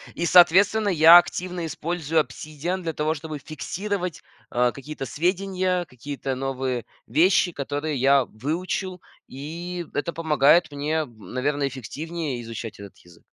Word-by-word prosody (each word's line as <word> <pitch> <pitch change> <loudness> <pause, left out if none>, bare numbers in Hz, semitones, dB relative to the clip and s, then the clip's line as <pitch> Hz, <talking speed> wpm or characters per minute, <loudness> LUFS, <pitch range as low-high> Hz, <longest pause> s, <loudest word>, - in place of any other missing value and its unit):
и, 170 - -1
соответственно, 185 +5 +5
я 165 -1 +9
активно 175 0 -4
использую 160 0 -1
"Обсидиан" 155 +4 -3
для 165 -2 -3
того, 155 +1 0
чтобы 155 0 -6
фиксировать, 180 +5 -4 0.3
э, 120 0 +2
какие-то 140 0 -7
сведения, 180 - -1
какие-то 135 0 -5
новые 130 -2 -2 0.2
вещи, 175 +2 +3
которые 145 0 -3
я 135 +1 +4
выучил, 180 - -4 0.3
и 170 +6 -6
это 145 +4 -2
помогает 155 0 +3
мне, 150 +2 -1
наверное, 130 +4 -3
эффективнее 140 +2 -5
изучать 115 -2 -7
этот 100 -1 -11
язык. 85 -1 -19
155 Hz, 125 wpm, -24 LUFS, 135-175 Hz, 0.3 s, я